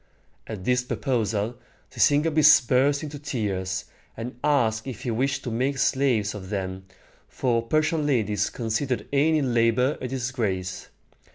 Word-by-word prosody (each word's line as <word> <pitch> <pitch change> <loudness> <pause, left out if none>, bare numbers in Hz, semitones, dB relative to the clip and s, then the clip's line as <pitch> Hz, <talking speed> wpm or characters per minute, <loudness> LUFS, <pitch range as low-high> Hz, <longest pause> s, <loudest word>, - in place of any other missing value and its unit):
At 105 -4 -6
this 125 +4 +2
proposal, 115 -3 -2 0.3
Sisygambis 150 0 +5
burst 140 +3 +2
into 145 -1 -6
tears, 95 -9 -3 0.3
and 115 +1 -6
asked 115 -6 +1
if 125 -3 -6
he 125 - -2
wished 135 +4 -1
to 125 - -4
make 130 +4 -1
slaves 130 -6 +1
of 95 -3 -8
them, 95 -2 -4 0.4
for 120 -3 0
Persian 155 +5 0
ladies 105 -7 +1
considered 120 +3 -2
any 150 +2 +3
labor 120 +2 +2
a 125 - -3
disgrace. 115 -8 -3
125 Hz, 130 wpm, -25 LUFS, 110-140 Hz, 0.4 s, Sisygambis